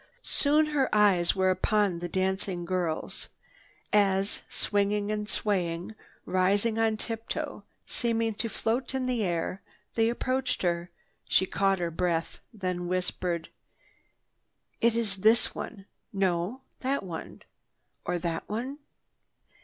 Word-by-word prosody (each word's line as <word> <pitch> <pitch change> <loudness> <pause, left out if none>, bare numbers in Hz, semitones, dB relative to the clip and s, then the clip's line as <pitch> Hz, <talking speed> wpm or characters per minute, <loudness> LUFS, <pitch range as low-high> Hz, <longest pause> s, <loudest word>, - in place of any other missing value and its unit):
Soon 300 +2 +4
her 270 -3 +3
eyes 200 -5 +4
were 190 -1 +3
upon 200 -2 +2
the 175 0 -4
dancing 190 -1 -1
girls. 175 -3 -1 0.7
As, 195 -1 +3
swinging 205 0 +1
and 210 0 -2
swaying, 180 -2 -1 0.3
rising 200 +5 +2
on 220 -1 +2
tip 225 0 -4
toe, - - -3 0.2
seeming 230 -2 0
to 230 +2 -2
float 240 +5 -1
in 260 -1 0
air, 185 -5 -1 0.3
they 225 0 +3
approached 255 +1 -1
her, 175 0 0 0.4
she 190 - +4
caught 195 +1 +2
her 170 -2 -1
breath, 165 -1 -1
then 180 -4 -3
whispered: 180 -2 -1 1.3
"It 230 0 +4
is 215 -4 0
this 220 +4 +4
one. 195 -4 -7 0.3
No, 190 +5 0 0.2
that 270 -1 0
one—or 175 0 -7
that 165 -1 -3
one." 250 +7 -3
200 Hz, 120 wpm, -29 LUFS, 180-225 Hz, 1.3 s, Soon